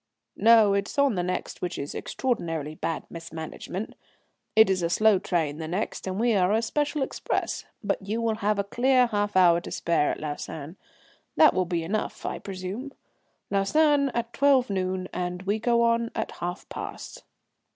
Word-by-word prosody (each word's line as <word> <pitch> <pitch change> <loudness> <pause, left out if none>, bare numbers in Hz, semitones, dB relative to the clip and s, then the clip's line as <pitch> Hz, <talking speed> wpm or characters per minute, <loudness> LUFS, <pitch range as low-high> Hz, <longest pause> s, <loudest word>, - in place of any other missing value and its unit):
"No, 220 -2 +6
it 200 0 0
is - - -9
on 280 -3 +4
the 180 - 0
next, 180 +1 -4
which 180 -1 -3
is 140 - -5
extraordinarily 165 - -2
bad 160 0 -3
mismanagement. 165 +4 -6 0.6
It 220 +1 +7
is 190 -1 +1
a 170 - 0
slow 210 +3 +4
train 160 -6 -1
the 160 - -4
next, 190 +3 -3
and 190 +1 -2
we 235 0 +3
are 185 -2 +3
a 225 +1 +2
special 295 +4 0
express. - - -2 0.2
But - - -1
you 210 +4 -3
will 225 -1 0
have 210 -1 0
a 200 - +1
clear 250 +5 +3
half 205 -3 -1
hour 175 -2 +6
to - - -8
spare 165 -3 +1
at - - -3
Lausanne. 150 +1 -6 0.6
That 310 - +6
will 185 - +1
be 170 -2 -1
enough, 210 +6 -3
I - - -3
presume? 195 +8 -6 0.6
Lausanne 280 +8 +3
at 235 0 -2
12 275 -5 +3
noon, 185 -1 -1
and 180 0 -3
we 205 +3 0
go 235 +1 +2
on 230 0 +2
at - - -2
half 175 +2 -5
past." - - -7
200 Hz, 180 wpm, -26 LUFS, 175-230 Hz, 0.6 s, It